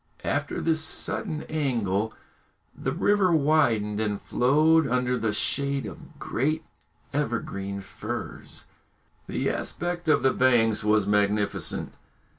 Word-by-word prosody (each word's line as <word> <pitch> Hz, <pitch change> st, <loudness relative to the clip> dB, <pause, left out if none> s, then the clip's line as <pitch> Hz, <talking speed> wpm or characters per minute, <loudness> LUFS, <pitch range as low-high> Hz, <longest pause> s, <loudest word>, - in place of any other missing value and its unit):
After -, -, -1 dB
this 160 Hz, -1 st, +2 dB
sudden 155 Hz, -1 st, -1 dB
angle 115 Hz, -9 st, -1 dB, 0.6 s
the 135 Hz, -, -2 dB
river 185 Hz, +4 st, +2 dB
widened 140 Hz, -9 st, +2 dB
and 105 Hz, -2 st, -1 dB
flowed 155 Hz, +4 st, +3 dB
under 125 Hz, 0 st, +1 dB
the 115 Hz, -3 st, 0 dB
shade 140 Hz, +6 st, -1 dB
of -, -, -10 dB
great 155 Hz, +6 st, -1 dB, 0.5 s
evergreen 100 Hz, 0 st, -2 dB
firs. -, -, -7 dB, 0.6 s
The -, -, -2 dB
aspect 175 Hz, 0 st, -4 dB
of 150 Hz, -5 st, +3 dB
the 130 Hz, -, +4 dB
banks 115 Hz, -4 st, +3 dB
was 105 Hz, -1 st, +3 dB
magnificent. 105 Hz, 0 st, 0 dB
125 Hz, 110 wpm, -26 LUFS, 105-155 Hz, 0.6 s, the